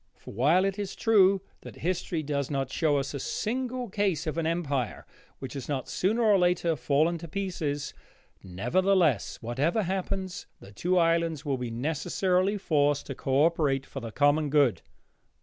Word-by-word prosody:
For, - - -12
while 150 - +3
it 195 +1 -2
is 200 -2 -4
true 195 -4 +4 0.2
that - - -11
history 175 -2 -2
does 140 -2 -2
not 135 -2 -2
show 150 -3 +1
us 135 0 -2
a 140 - -4
single 250 - -3
case 195 -4 -1
of 155 +1 -2
an 160 - 0
empire 145 -8 -2 0.3
which 135 - -7
has 135 -1 -7
not 135 -3 -2
sooner 220 +6 0
or 210 -3 +5
later 175 -2 +2
fallen 155 +5 +1
to 170 - -8
pieces, 155 -6 -3 0.5
nevertheless, 140 - +1
whatever 145 - 0
happens, 190 0 -3
the 100 - -13
two 180 - 0
islands 165 -2 +1
will 135 -3 -1
be 125 -1 -3
necessarily 180 - 0
forced 145 -6 +1
to 135 - -5
co 135 +3 +2
operate 145 -5 +1
for 135 - -7
the 115 -3 -7
common 145 +3 +2
good. 140 - +3
160 Hz, 165 wpm, -28 LUFS, 140-185 Hz, 0.5 s, or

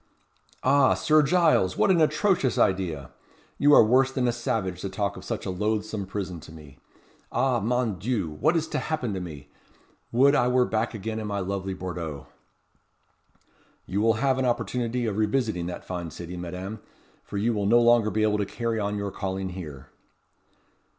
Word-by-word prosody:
"Ah, 140 -2 +4
Sir 155 0 +4
Giles! 150 - +3
what - - +4
an 170 -3 +4
atrocious 155 - +2
idea. 85 -7 0 0.5
You 145 - +5
are - - +8
worse 130 +4 +3
than 130 -2 0
a - - +3
savage 100 -6 -2
to 100 - -3
talk 100 +1 -2
of - - -10
such - - -4
a - - -2
loathsome 105 +1 -2
prison 95 -3 -4
to 80 - -13
me. 75 -4 -14 0.5
Ah! 130 -3 +1
mon 115 -3 -1
Dieu! 105 -7 -1
what 155 +5 +3
is 160 -1 -1
to - - -1
happen 140 -9 -2
to 95 - -3
me! 75 -5 -9 0.6
would 135 +4 +5
I 125 - +3
were 125 0 +3
back 110 +1 -1
again 110 +1 -4
in 110 - -4
my 100 -1 -2
lovely 95 0 -3
Bordeaux!" 85 -6 -5 1.6
"You 100 +3 -1
will 115 +1 +4
have 130 +3 +1
an 130 - +1
opportunity 120 0 -1
of 105 -3 -2
revisiting 110 -5 0
that 90 - -7
fine 90 -2 -5
city, 85 +3 -8
Madame; 90 +4 -6 0.4
for 100 - -6
you 115 +4 +1
will 100 -2 -1
no 120 +3 +6
longer 120 -2 +4
be 110 +2 0
able 105 -1 +2
to 100 - 0
carry 115 0 -2
on 105 0 -2
your 100 -1 -3
calling 95 -1 -3
here." 75 -8 -9
105 Hz, 185 wpm, -26 LUFS, 95-125 Hz, 1.6 s, are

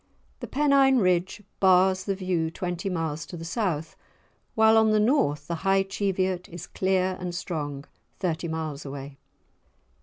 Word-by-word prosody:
The - - -6
Pennine 275 -2 +4
Ridge 185 -1 +1 0.2
bars 185 0 +4
the 195 - -1
view 180 -4 -1
twenty 180 +3 -4
miles 160 -4 -2
to 175 - -8
the 165 - -7
south, 165 -5 -2 0.6
while 220 0 +5
on 220 0 +5
the 215 0 +3
North 210 - +2
the 170 +1 -3
High 195 0 +3
Cheviot 190 -2 -2
is 175 0 -8
clear 185 -1 0
and 180 -1 -4
strong, 145 -5 -4 0.3
thirty 170 -2 -2
miles 160 -3 -4
away. 135 0 -8
180 Hz, 150 wpm, -26 LUFS, 160-195 Hz, 0.6 s, while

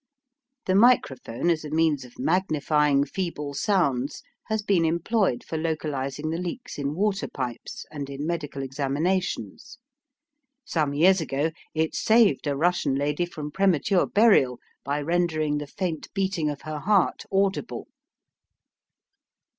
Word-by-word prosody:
The 185 - +1
microphone 175 - +3
as 160 -2 -1
a 150 - -6
means 155 -3 +1
of 125 - -16
magnifying 150 -3 +2
feeble 150 -6 -4
sounds 140 - 0 0.2
has 220 -1 -1
been 195 -5 +2
employed 170 - +1
for 160 - -4
localising 150 -2 -2
the 165 - -2
leaks 180 - -6
in 140 +1 -2
water 200 +2 0
pipes 125 -3 -6
and 145 -2 -5
in 140 +1 -5
medical 150 -5 -3
examinations. 145 - -2 0.9
Some 150 -4 0
years 185 +4 +5
ago 150 +1 -1 0.2
it 160 0 0
saved 220 -7 +3
a 140 -1 0
Russian 165 -3 +1
lady 150 +5 0
from 155 -4 -7
premature 190 0 +2
burial 200 - +4 0.3
by 145 +2 -2
rendering 155 -3 0
the 145 - -6
faint 170 -1 -4
beating 190 -5 0
of 145 -2 -5
her 155 -1 -5
heart 195 +2 +2
audible. 195 0 0
155 Hz, 130 wpm, -25 LUFS, 145-185 Hz, 0.9 s, years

